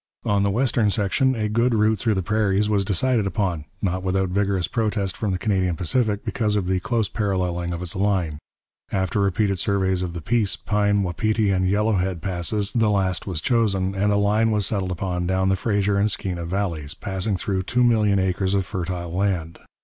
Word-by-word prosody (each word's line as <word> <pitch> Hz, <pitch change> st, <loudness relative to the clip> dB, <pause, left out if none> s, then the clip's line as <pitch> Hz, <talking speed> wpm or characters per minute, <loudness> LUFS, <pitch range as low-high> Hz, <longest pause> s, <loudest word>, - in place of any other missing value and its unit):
On 100 Hz, -1 st, +2 dB
the 100 Hz, -, +2 dB
western 115 Hz, 0 st, +2 dB
section 115 Hz, +7 st, +1 dB
a 110 Hz, -2 st, -1 dB
good 115 Hz, +3 st, +1 dB
route 110 Hz, 0 st, +2 dB
through 110 Hz, -3 st, +1 dB
the 95 Hz, -, -1 dB
prairies 105 Hz, 0 st, +1 dB
was 105 Hz, -2 st, +2 dB
decided 110 Hz, +2 st, +1 dB
upon, 90 Hz, -7 st, -2 dB, 0.2 s
not 95 Hz, -1 st, 0 dB
without 95 Hz, 0 st, 0 dB
vigorous 95 Hz, -1 st, 0 dB
protest 105 Hz, -4 st, -1 dB
from 105 Hz, -, -2 dB
the 90 Hz, -, 0 dB
Canadian 95 Hz, -3 st, 0 dB
Pacific 105 Hz, +4 st, 0 dB
because 110 Hz, -6 st, 0 dB
of 100 Hz, -3 st, 0 dB
the 95 Hz, 0 st, 0 dB
close 115 Hz, +2 st, 0 dB
paralleling 90 Hz, -4 st, -1 dB
of 85 Hz, +1 st, -4 dB
its 85 Hz, -, -3 dB
line. 95 Hz, -6 st, 0 dB, 0.5 s
After 95 Hz, +1 st, 0 dB
repeated 100 Hz, 0 st, +1 dB
surveys 95 Hz, -2 st, +1 dB
of 90 Hz, -2 st, -3 dB
the 85 Hz, -, -5 dB
Peace, 105 Hz, +2 st, +1 dB
Pine, 105 Hz, -1 st, +1 dB
Wapiti, 105 Hz, +4 st, 0 dB
and 95 Hz, -1 st, +1 dB
Yellowhead 95 Hz, -3 st, +1 dB
Passes, 95 Hz, +3 st, -2 dB
the 115 Hz, -3 st, +2 dB
last 95 Hz, -3 st, 0 dB
was 85 Hz, -5 st, -3 dB
chosen, 100 Hz, -6 st, +1 dB
and 100 Hz, +1 st, +1 dB
a 100 Hz, -, +2 dB
line 105 Hz, +2 st, +2 dB
was 105 Hz, -3 st, +1 dB
settled 95 Hz, -2 st, -1 dB
upon 90 Hz, 0 st, -2 dB
down 95 Hz, +1 st, +1 dB
the 95 Hz, -, +3 dB
Fraser 100 Hz, 0 st, 0 dB
and 105 Hz, +2 st, +2 dB
Skeena 90 Hz, -4 st, -3 dB
valleys, 85 Hz, -5 st, -3 dB
passing 95 Hz, +1 st, -2 dB
through 95 Hz, +2 st, -1 dB
two 125 Hz, +6 st, +1 dB
million 110 Hz, -4 st, +3 dB
acres 95 Hz, +1 st, 0 dB
of 95 Hz, -2 st, +1 dB
fertile 90 Hz, -2 st, -4 dB
land. 90 Hz, -4 st, -1 dB
100 Hz, 195 wpm, -23 LUFS, 90-105 Hz, 0.5 s, the